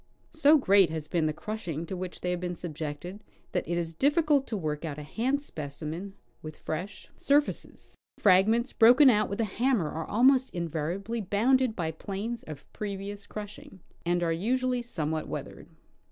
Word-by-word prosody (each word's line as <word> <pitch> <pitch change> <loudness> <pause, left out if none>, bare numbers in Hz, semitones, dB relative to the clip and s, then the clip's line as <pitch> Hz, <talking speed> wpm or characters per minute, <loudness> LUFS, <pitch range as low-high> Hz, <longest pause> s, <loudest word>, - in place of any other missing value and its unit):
So 315 -1 +6
great 200 - +5
has 155 -1 -4
been 160 0 +1
the - - +1
crushing 170 -2 -5
to 190 - -5
which 180 0 -6
they 180 - -1
have 180 - -1
been 175 0 -3
subjected 165 +4 -6 0.3
that 180 - -2
it 170 - -1
is 165 -1 -2
difficult 290 - +2
to 220 - -3
work 155 -4 -3
out 155 -3 -4
a 150 - -6
hand 255 - -1
speoimen 160 - -6 0.3
with 155 0 -8
fresh 180 +6 -5
sur 285 +1 +5
faces. 295 - -7 0.2
Fragments 220 +6 +4
broken 250 +4 +7
out 210 -2 +2
with 200 - -4
a - - +3
hammer 220 - 0
are 160 0 -5
almost 260 +2 +3
inva 165 0 -2
riably 225 +4 -4
bounded 250 +3 +3
by 160 -3 -2
plains 205 +8 -5
of 150 -3 -10
previous 200 0 -5
crushing, 205 -2 -9 0.2
and 175 +1 +1
are 165 -1 +1
usually 250 +7 0
somewhat 160 -9 -3
weathered. - - -7
195 Hz, 175 wpm, -28 LUFS, 165-235 Hz, 0.3 s, broken